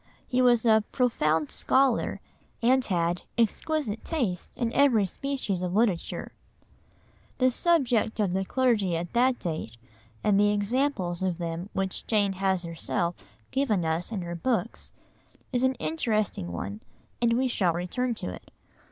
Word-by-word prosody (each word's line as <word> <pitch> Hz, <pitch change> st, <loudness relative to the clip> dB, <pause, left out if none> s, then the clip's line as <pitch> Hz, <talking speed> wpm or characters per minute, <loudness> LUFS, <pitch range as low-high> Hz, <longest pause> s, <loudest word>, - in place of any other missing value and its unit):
He 255 Hz, 0 st, +1 dB
was 245 Hz, -2 st, +4 dB
a 220 Hz, -1 st, +5 dB
"profound 160 Hz, -, +1 dB
scholar" 265 Hz, -2 st, +2 dB, 0.4 s
and 255 Hz, +2 st, +3 dB
had 175 Hz, -2 st, 0 dB, 0.2 s
"exquisite 235 Hz, +1 st, 0 dB
taste 235 Hz, -, -2 dB
in 235 Hz, -2 st, -1 dB
every 245 Hz, -8 st, +4 dB
species 235 Hz, -4 st, -3 dB
of 180 Hz, 0 st, -2 dB
literature." 210 Hz, -6 st, 0 dB, 1.1 s
The 255 Hz, -1 st, +3 dB
subject 250 Hz, -8 st, +2 dB
of 195 Hz, -4 st, +1 dB
the 190 Hz, +1 st, 0 dB
clergy 215 Hz, -6 st, +1 dB
at 170 Hz, +1 st, -5 dB
that 250 Hz, +1 st, +3 dB
date, 155 Hz, -9 st, -5 dB, 0.5 s
and 200 Hz, -1 st, +3 dB
the 205 Hz, 0 st, +4 dB
examples 205 Hz, -4 st, 0 dB
of 185 Hz, -3 st, 0 dB
them 170 Hz, +2 st, -4 dB
which 190 Hz, -1 st, -2 dB
Jane 205 Hz, -3 st, +2 dB
has 190 Hz, -1 st, 0 dB
herself 170 Hz, +1 st, -2 dB, 0.4 s
given 225 Hz, -10 st, +1 dB
us 160 Hz, +5 st, -1 dB
in 200 Hz, -5 st, -3 dB
her 170 Hz, 0 st, -5 dB
books, 230 Hz, +9 st, -2 dB, 0.6 s
is 245 Hz, -, +2 dB
an 260 Hz, 0 st, +2 dB
interesting 215 Hz, -, -1 dB
one, 95 Hz, +5 st, -5 dB, 0.4 s
and 235 Hz, -1 st, +3 dB
we 260 Hz, +2 st, +2 dB
shall 190 Hz, -8 st, +1 dB
return 230 Hz, +8 st, -2 dB
to 90 Hz, -, -5 dB
it. -, -, -12 dB
210 Hz, 145 wpm, -27 LUFS, 175-250 Hz, 1.1 s, a